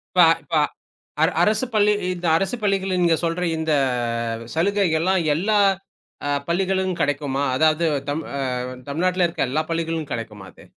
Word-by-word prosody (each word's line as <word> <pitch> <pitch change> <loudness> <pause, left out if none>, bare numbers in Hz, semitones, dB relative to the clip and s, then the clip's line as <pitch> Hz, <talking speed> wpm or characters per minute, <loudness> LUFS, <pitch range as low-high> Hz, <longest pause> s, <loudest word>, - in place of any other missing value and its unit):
இப்ப 180 - +7 0.2
இப்ப 145 +3 -5 0.7
அர 160 - +5
அரசுப் 220 +5 +1
பள்ளி 210 -1 +4 0.2
இந்த 175 0 -3
அரசுப் 195 +6 -2
பள்ளிகள் 195 -1 +1
நீங்கச் 170 -1 +2
சொல்ற 170 +1 -1
இந்தச் 120 -7 -1
சலுகை 200 +5 +2
எல்லாம் 185 +3 +2 0.2
எல்லா 210 +6 +1 0.9
பள்ளிகளிலும் 190 +1 0
கெடைக்குமா? 145 -1 -1
அதாவது 155 +4 +3 0.2
தமிழ் 155 +3 -3
அ - - -3 0.5
தமிழநாட்ல 180 +5 +1
இருக்க 165 -6 -2
எல்லா 150 +4 0
பள்ளிகளிலும் 165 -2 -2
கெடைக்குமா 105 -4 -6
அது? - - -17
165 Hz, 140 wpm, -22 LUFS, 145-190 Hz, 0.9 s, இப்ப